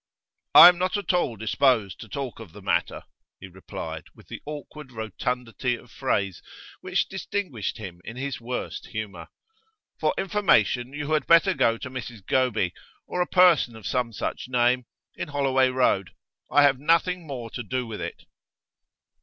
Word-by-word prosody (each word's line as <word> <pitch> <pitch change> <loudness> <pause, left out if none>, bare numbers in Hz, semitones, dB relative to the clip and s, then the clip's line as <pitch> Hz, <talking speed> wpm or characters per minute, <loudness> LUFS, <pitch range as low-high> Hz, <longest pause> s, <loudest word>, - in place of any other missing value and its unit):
'I 175 - +13
am 180 - +1
not 185 +3 0
at 205 -1 -1
all 175 -10 +1
disposed 110 -1 +1
to 110 - -10
talk 135 -2 -5
of 110 -8 -11
the - - -11
matter,' - - 0 0.4
he 95 - -9
replied, 95 0 -8
with - - -19
the - - -7
awkward 150 -1 -8
rotundity 120 +2 -3
of 120 0 -15
phrase 100 -8 -1 0.4
which - - -1
distinguished 185 - -4
him 90 -5 -9
in 115 - -8
his 135 -1 -4
worst 125 +2 -5
humour. 100 -7 -6 0.7
'For - - +1
information 130 - +2
you 145 +1 -5
had 155 -1 +1
better 170 +3 +6
go 115 -9 +2
to 130 - -7
Mrs 120 -5 -7
Goby 115 -9 +1 0.3
or 180 - -2
a 175 - +1
person 175 -10 +4
of 110 - -12
some 125 -2 -1
such 115 - -4
name 125 0 +2 0.3
in - - -5
Holloway 135 -2 +2
Road. 125 -7 +1 0.4
I 145 - +5
have 140 -2 +4
nothing 170 +3 +1
more 120 -5 -6
to - - -5
do 125 +3 -3
with 110 -2 -7
it. - - -6
125 Hz, 165 wpm, -25 LUFS, 110-150 Hz, 0.7 s, I